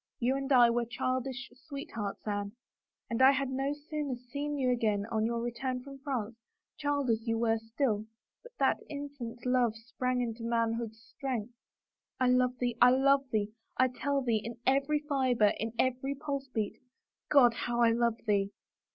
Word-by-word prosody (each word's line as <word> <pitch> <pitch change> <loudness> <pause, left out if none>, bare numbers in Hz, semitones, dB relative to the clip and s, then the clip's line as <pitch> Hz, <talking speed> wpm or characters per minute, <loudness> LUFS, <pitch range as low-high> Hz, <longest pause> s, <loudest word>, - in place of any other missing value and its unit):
You 255 +2 +2
and 275 +1 -3
I 240 -3 +7
were 235 0 +1
childish 255 +2 -3 0.2
sweethearts, 230 -8 -5
Anne, 205 -1 -2 0.5
and 230 +2 -1
I 265 +1 +9
had 275 -1 -1
no 270 +2 0 0.2
sooner 300 -4 -2
seen 285 +4 -4
you 255 -2 +2
again 215 -4 +1
on 220 0 +1
your 235 0 -1
return 250 +1 -3
from 275 0 -10
France, 245 -5 -3 0.4
child 285 -4 0
as 225 +1 -1
you 225 0 +1
were 225 -1 +2
still, 225 -1 -1 0.3
but 485 - -14
that - - +2
infant 280 -5 -7
love 250 -3 +2
sprang 250 +2 -2
into 230 -1 -3
manhood's 230 -1 -1
strength. 245 -1 -4 0.7
I 255 -1 +3
love 250 0 +3
thee 245 -2 -1
— - - -26
I 245 - +9
love 270 +1 +4
thee, 210 -2 0 0.3
I 255 0 +4
tell 280 +2 -1
thee, 230 -3 +1
in 235 +1 -6
every 275 +3 +2
fiber, 255 -7 +3
in 225 +1 -2
every 260 +2 0
pulse 280 -1 -4
beat. 220 -5 -3 0.5
God, 250 -5 +6
how 240 0 -1
I 230 -1 +6
love 235 -1 +1
thee 200 -2 +2
245 Hz, 175 wpm, -31 LUFS, 230-270 Hz, 0.7 s, I